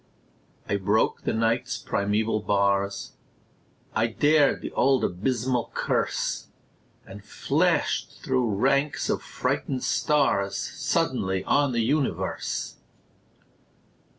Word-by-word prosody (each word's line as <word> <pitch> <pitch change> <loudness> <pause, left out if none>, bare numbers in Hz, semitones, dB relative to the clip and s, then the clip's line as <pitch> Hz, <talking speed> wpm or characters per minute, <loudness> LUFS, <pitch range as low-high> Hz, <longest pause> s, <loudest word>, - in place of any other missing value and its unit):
I 100 - 0
broke 100 +3 +1
the - - 0
Night's 115 +3 0
primeval 110 +1 0
bars, 100 -1 0 0.8
I 110 +1 +2
dared 145 +5 +3
the - - -5
old 135 0 +2
abysmal 120 +6 -1
curse, - - -1 0.6
And 100 +1 -11
flashed - - 0
through 120 -5 +1
ranks 140 +6 +1
of - - -1
frightened 130 -2 -2
stars 135 -10 +1
Suddenly 95 0 -1
on 145 -2 +2
the 120 -1 0
universe! 140 +4 -2
115 Hz, 95 wpm, -26 LUFS, 100-135 Hz, 0.8 s, dared